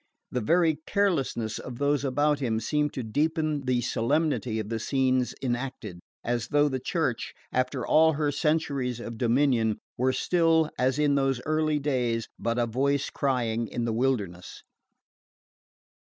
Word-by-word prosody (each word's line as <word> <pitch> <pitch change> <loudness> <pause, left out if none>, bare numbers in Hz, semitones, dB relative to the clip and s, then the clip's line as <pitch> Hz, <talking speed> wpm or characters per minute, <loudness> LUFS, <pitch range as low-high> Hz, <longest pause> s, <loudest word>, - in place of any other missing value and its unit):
The 125 - -1
very 160 +4 +2
carelessness 140 - 0
of 125 -2 -8
those 145 +1 +1
about 145 +2 +1
him 115 -5 0
seemed 150 +5 0
to 130 - -4
deepen 155 +4 -1
the 125 -1 +2
solemnity 125 0 0
of 110 -1 -4
the 115 -1 -2
scenes 130 +1 +1
enacted 120 -7 -3 0.2
as 120 0 -1
though 145 +2 +3
the 130 -2 -2
Church, 130 -4 -2 0.2
after 130 0 -1
all 160 +1 +5
her 150 0 0
centuries 140 -5 0
of 115 -1 -7
dominion, 120 -3 +2 0.2
were 130 +1 +3
still, 165 +1 +2
as 130 +2 +2
in 150 -1 +3
those 135 -2 +1
early 155 0 +1
days, 125 -5 -1
but 115 +1 -1
a 120 - +2
voice 135 +4 0
crying 120 -4 0
in 120 +3 -3
the 115 - -1
wilderness. 105 -9 -2
130 Hz, 150 wpm, -27 LUFS, 120-150 Hz, 0.2 s, all